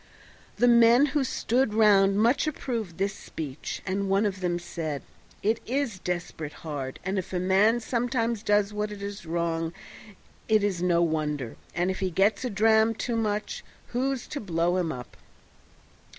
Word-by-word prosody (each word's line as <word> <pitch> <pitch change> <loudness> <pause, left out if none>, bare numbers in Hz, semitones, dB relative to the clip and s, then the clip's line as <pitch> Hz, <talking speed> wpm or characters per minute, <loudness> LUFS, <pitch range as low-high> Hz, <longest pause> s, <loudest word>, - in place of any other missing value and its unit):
The 245 - +4
men 235 +3 +6
who 295 -2 +2
stood 245 -2 0
round 200 -3 +5
much 235 +8 +3
approved 230 - -3
this 195 +1 0
speech, 150 -7 -6
and 195 +1 -1
one 195 +2 +3
of 200 -2 -2
them 175 -1 0
said, 165 -4 -5 0.4
"It 220 +2 +2
is 250 -5 -1
desperate 175 -4 -4
hard, 140 -4 -5
and 190 +1 0
if 190 +1 -7
a 180 - 0
man 195 +6 +3
sometimes 235 -1 -1
does 205 -1 +2
what 210 0 -2
is 200 -2 -7
wrong 165 0 -1 0.7
it 215 -2 +3
is 190 -4 0
no 170 -1 +3
wonder, 150 -6 -1 0.2
and 175 +2 +1
if 190 - -5
he 190 -1 0
gets 195 +7 +2
a 250 - -1
dram 220 +1 +3
too 235 +2 -2
much 215 - -2 0.3
who's 260 +1 -1
to 290 - -4
blow 175 -2 0
him 175 -3 0
up?" 125 -4 -8
200 Hz, 165 wpm, -27 LUFS, 175-225 Hz, 0.7 s, men